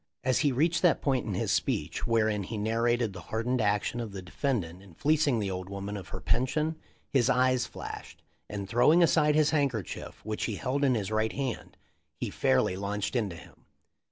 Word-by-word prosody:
As 130 -1 +2
he 145 -3 +3
reached 160 +5 +2
that 175 -3 +4
point 130 -5 0
in 100 - -2
his - - 0
speech - - -1
wherein 110 -3 +2
he 110 +4 -5
narrated 115 +1 +1
the 90 - -8
hardened 115 +7 -1
action 105 +3 0
of 115 -4 -5
the 95 - -5
defendant 90 - -2
in 95 -4 -16
fleecing 150 - +2
the 100 -3 -1
old 95 0 -5
woman 100 +1 -5
of 95 -3 -7
her - - -6
pension 150 +5 0 0.4
his 130 -5 +3
eyes 130 0 +3
flashed, - - -9 0.3
and 100 -1 -5
throwing 150 - +5
aside 150 -2 +4
his 155 -1 +4
handker 135 - +1
chief, - - -9
which 110 0 -2
he 110 - -2
held 135 +7 -1
in 130 -3 +4
his 105 -2 -2
right 110 +1 +1
hand, 130 -4 -4 0.4
he - - -3
fairly 65 +7 +2
launched 100 +4 -3
into 105 -8 0
him. 85 - -15
115 Hz, 195 wpm, -29 LUFS, 100-135 Hz, 0.4 s, throwing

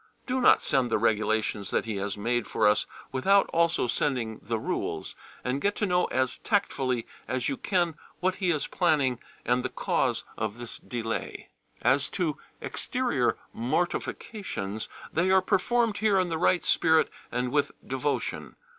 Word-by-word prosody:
Do 255 0 0
not - - +6
send 130 -3 +2
the - - +2
regulations 110 -2 +1
that - - 0
he 110 -3 -3
has 100 +1 -3
made 120 +2 0
for - - +2
us 105 - +3 0.2
without 195 +10 +4
also 170 -3 +3
sending 120 -3 -1
the 115 +2 -2
rules, - - -3 0.3
and 130 +2 -1
get 205 0 +1
to 210 - 0
know 180 -2 +2
as 130 -1 0
tactfully 130 - 0 0.2
as 130 0 -1
you - - -1
can 175 +1 0 0.3
what 185 +1 0
he 185 -3 0
is 155 -4 +1
planning 145 -8 +2 0.3
and 125 +1 +2
the - - -1
cause - - 0 0.2
of 110 0 -2
this 120 -2 -6
delay. 115 -2 -4 0.3
As 140 +2 +3
to 165 -6 0 0.2
exterior - - 0 0.2
mortifications, 120 - -2 0.2
they 170 +3 +2
are 190 0 +6
performed 225 +4 +1
here 205 -2 +3
in 185 -1 +1
the 160 -1 -2
right 180 +1 +3
spirit 160 -1 +4 0.2
and 125 +1 -1
with 145 -1 +2
devotion. 135 +2 -2
135 Hz, 160 wpm, -28 LUFS, 115-180 Hz, 0.3 s, not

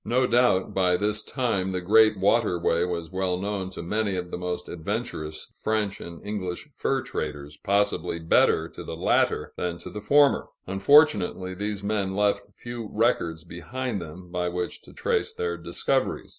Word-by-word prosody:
No 125 +3 +2
doubt, 120 -6 +3
by 90 -2 +3
this 105 +1 0
time, 100 -9 -1
the 90 - 0
great 110 +3 +5
waterway 95 -5 +2
was 85 -2 -4
well 95 -1 0
known 100 -1 -3
to 95 - -7
many 105 +2 0
of 90 -1 -4
the - - -3
most 90 0 -3
adventurous 80 -2 -4
French 110 -2 0
and 85 +2 -9
English 95 -4 -4
fur 135 -1 0
traders, 75 -1 -5
possibly 100 -4 +1
better 80 0 +3
to - - -9
the - - -6
latter - - +1
than 90 -1 -2
to - - -9
the 105 - -6
former; 140 +7 +4 0.2
unfortunately, 95 - +4
these 100 +1 -3
men 100 -2 -1
left 105 0 +1
few 120 -3 -7
records 95 -8 +1
behind 105 +6 -4
them, 85 +2 -10
by 90 0 -1
which 90 0 -4
to - - -15
trace 460 -1 0
their 450 0 -2
discoveries. - - -1
95 Hz, 165 wpm, -26 LUFS, 90-110 Hz, 0.2 s, great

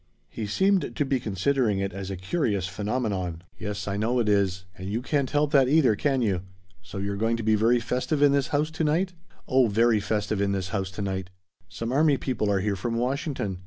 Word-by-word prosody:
He 110 -2 -4
seemed 190 - +1
to 145 - +1
be 135 -1 0
considering 110 +1 0
it 100 0 -2
as 95 0 -5
a 95 - -3
curious 100 - -1
phenomenon. 100 -4 -2 0.2
"Yes, 100 -1 -4
I 100 0 -1
know 115 +4 0
it 120 -3 +1
is. 95 -2 +1
And 95 +1 -7
you 110 +3 -1
can't 140 -1 0
help 145 0 +1
that 135 -4 +5
either, 140 -7 +4
can 135 +2 +1
you? 95 -5 0 0.4
So 95 +3 -9
you're 100 +1 -2
going 115 +3 0
to 115 - -4
be 110 0 +3
very 115 +3 +3
festive 125 +5 -1
in 145 - +6
this 140 -2 +2
house 150 +2 0
to 160 0 -2
night?" 170 +5 +1 0.3
"Oh 130 -1 +4
very 115 +1 +3
festive 105 0 -1
in 100 0 +1
this 95 -1 -2
house 95 -3 -2
to 100 +2 -5
night. 95 -2 -3 0.4
Some 115 +7 -4
army 145 +1 +3
people 125 -6 -1
are 100 -2 +2
here 100 0 0
from 115 +5 -3
Washington. 125 - -2
110 Hz, 220 wpm, -26 LUFS, 100-135 Hz, 0.4 s, in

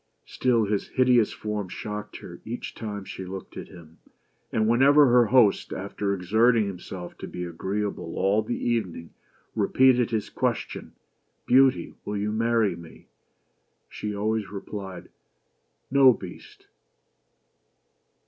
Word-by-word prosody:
Still 120 -4 +1
his 100 -1 -1
hideous 125 -4 +3
form 105 -3 -4
shocked 105 +2 -6
her - - -11
each 120 +2 -6
time 105 -3 -6
she 95 - -7
looked 95 +1 -8
at - - -7
him; 85 -2 -15 0.5
and 110 0 +1
whenever 140 +5 +6
her 120 -2 +5
host, 120 -4 +3
after 100 +1 -3
exerting 110 +5 +3
himself 90 -2 -7
to - - -6
be 90 - -6
agreeable 95 +1 -4
all 100 +3 +2
the 110 +3 -3
evening, 95 -8 -2 0.4
repeated 130 -2 +3
his 110 -3 -2
question, - - -3 0.3
" - - -47
Beauty 130 -8 +4
will 105 0 -3
you 105 +1 -1
marry 115 -3 +1
me?" 85 -1 -14 0.8
she 105 -1 -5
always 110 0 -1
replied 100 -1 -7 0.4
" - - -47
No, 135 -2 +7
Beast." 95 -5 -11
105 Hz, 130 wpm, -26 LUFS, 95-120 Hz, 0.8 s, No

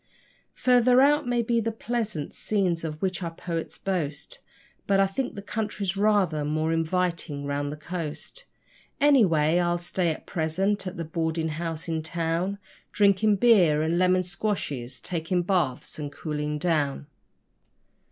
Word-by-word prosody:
Further 250 0 +4
out 290 0 +4
may 240 -1 +1
be 235 +1 +1
the 225 +1 -1
pleasant 220 -8 -3
scenes 185 -6 0
of 155 0 -5
which 185 -1 -1
our 170 - -2
poets 165 -2 -4
boast, 175 -7 -3 0.5
But 195 -1 +3
I 195 - +5
think 245 +7 -3
the 200 - -7
country's 205 -3 -2
rather 195 -7 +2
more 155 +2 0
inviting 165 -3 -1
round 145 0 -2
the 150 - -6
coast. 170 - -6 0.5
Anyway, 175 - +4
I'll 175 0 +1
stay 175 0 -1
at 155 - -4
present 190 +5 -1
at 185 0 -6
a 165 - -3
boarding 160 0 -1
house 165 +1 -4
in 160 -1 -1
town, 170 +4 -2 0.3
Drinking 205 +1 +4
beer 185 -9 +5
and 165 +2 +1
lemon 185 0 +3
squashes, 150 - -3
taking 175 +1 -1
baths 170 -8 -1
and 145 -1 -4
cooling 150 0 -3
down. 150 -4 0
175 Hz, 145 wpm, -26 LUFS, 155-200 Hz, 0.5 s, I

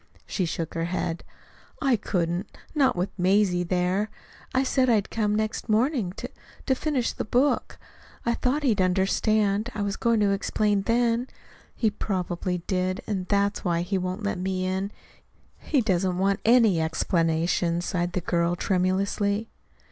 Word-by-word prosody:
She 185 - -1
shook 165 0 -4
her 165 0 -1
head. 175 -1 -2 0.6
"I 270 -5 +3
couldn't 180 -3 -2 0.2
not 285 -4 +3
with 180 +2 -1
Mazie 185 -1 +3
there. 180 +4 0 0.4
I 260 - +2
said 260 -1 +2
I'd 215 -4 +2
come 210 -2 0
the - - +1
next 215 +1 -2
morning 225 - +2
to - - -6 0.4
to 265 - +3
finish 265 -2 0
the - - -3
book. 255 +6 +1 0.5
I 235 - +2
thought 265 +5 0
he'd 220 -8 +2
understand 200 +3 +2
I 210 - -1
was 200 0 -2
going 230 -1 +2
to 200 -1 +3
explain 205 0 +1
then. 235 +3 +1 0.5
He 220 -3 +1
probably 180 -3 -2
did 185 0 -1
and 190 -4 -3
that's 200 0 +1
why 170 -2 +1
he 190 +2 -1
won't 185 +3 -3
let 205 -2 -1
me 185 0 -1
in. 190 +2 -2 0.7
He 285 -4 +1
doesn't 185 -4 +1
want 195 +1 +1
any 225 -7 +5
explanations," 170 +1 +1
sighed 175 -2 -1
the 185 - -1
girl 170 0 +1
tremulously. 200 +4 0
195 Hz, 155 wpm, -26 LUFS, 180-220 Hz, 0.7 s, any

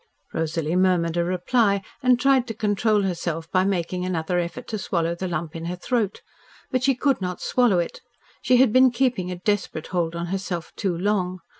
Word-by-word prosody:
Rosalie 160 0 -1
murmured 180 -3 +2
a 170 - +2
reply 200 +3 +1 0.2
and 250 -2 +4
tried 265 -2 +3
to 225 - -5
control 210 0 +1
herself 165 -3 -2
by 185 0 +3
making 180 -2 -1
another 180 -1 -1
effort 175 +9 -4
to 215 - -3
swallow 170 -3 -1
the 185 +2 -4
lump 170 -1 -4
in 165 0 -5
her 175 +1 -3
throat. 215 +1 -2 0.5
But 255 -2 +1
she 270 +1 +3
could 270 -2 +1
not 180 -1 -3
swallow 245 -7 +2
it. 170 -1 -2 0.4
She 250 +1 +4
had 250 -3 +4
been 255 0 +7
keeping 240 -7 0
a 180 - -3
desperate 190 -3 -2
hold 170 -2 0
on 170 0 -3
herself 180 -3 -4
too 190 -5 -1
long. 185 -1 0
185 Hz, 190 wpm, -24 LUFS, 170-225 Hz, 0.5 s, been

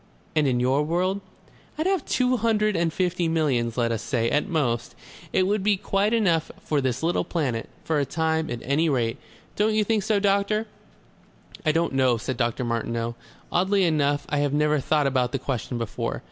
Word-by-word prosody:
"And 150 -2 +3
in 125 -2 +1
your 130 +3 +2
world?" 180 +6 0 0.6
"I'd 315 - -1
have 380 -5 +1
two 255 0 +1
hundred 215 -2 +1
and 165 -1 +1
fifty 180 0 0
millions, 135 -8 0
let 115 -1 +1
us 115 -2 -2
say. 115 -1 0
At 150 - +1
most. 120 - -1 0.4
It 185 - +3
would 205 +2 +1
be 205 0 +2
quite 200 +2 0
enough 180 -9 +2
for 150 -2 -1
this 130 +2 -1
little 170 +2 +1
planet, 130 -9 -2
for 160 -2 0
a - - +2
time, 160 +2 -1
at 120 - -4
any 150 +5 +1
rate. 120 -5 0 0.4
Don't 215 +1 +2
you 215 - +3
think 220 0 +1
so, 205 +1 +1
doctor?" 200 +2 +1 1.0
"I - - +6
don't 165 -1 0
know," 130 -3 +3
said 125 +3 -3
Dr. 120 +1 -1
Martineau. 115 0 -2 0.4
"Oddly 190 +2 +2
enough, 145 -4 +1
I 145 - 0
have 145 -1 0
never 150 0 +2
thought 150 +2 +1
about 130 -2 +1
that 135 -1 -2
question 125 -2 -3
before. 115 -2 -3
155 Hz, 190 wpm, -25 LUFS, 125-195 Hz, 1.0 s, I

